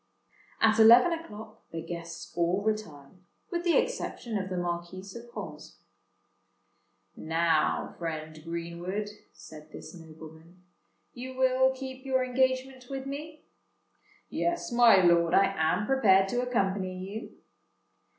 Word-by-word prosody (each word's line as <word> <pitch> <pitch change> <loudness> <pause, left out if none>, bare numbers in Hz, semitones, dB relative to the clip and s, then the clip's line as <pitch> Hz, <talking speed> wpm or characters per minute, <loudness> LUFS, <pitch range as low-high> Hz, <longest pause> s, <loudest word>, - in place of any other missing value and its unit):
At 220 0 +4
eleven 235 +9 +8
o'clock 220 -10 -9
the 165 -1 -6
guests 170 -1 -7
all 175 +3 +1
retired, 185 -8 -4 0.3
with 345 -1 -2
the 345 -1 +3
exception 230 -3 -2
of 190 -2 -2
the 185 - -3
Marquis 175 +1 -4
of 235 0 -10
Holmesford. - - -8 1.4
"Now, 165 -1 0
friend 155 -2 -5
Greenwood," 170 +5 -4 0.2
said 155 0 -13
this - - -10
nobleman, 160 +1 -14 0.5
"you 255 +1 -8
will 260 0 +3
keep 260 0 -8
your 260 -1 +1
engagement 260 0 0
with 270 -1 -5
me?" 300 +3 -7 0.8
"Yes, 345 -6 -2
my 235 -5 +6
lord: 170 -1 +4
I 195 0 +4
am 160 +5 +1
prepared 200 -7 +4
to 245 +3 0
accompany 195 -6 -1
you." 195 +4 -7
200 Hz, 120 wpm, -29 LUFS, 170-255 Hz, 1.4 s, eleven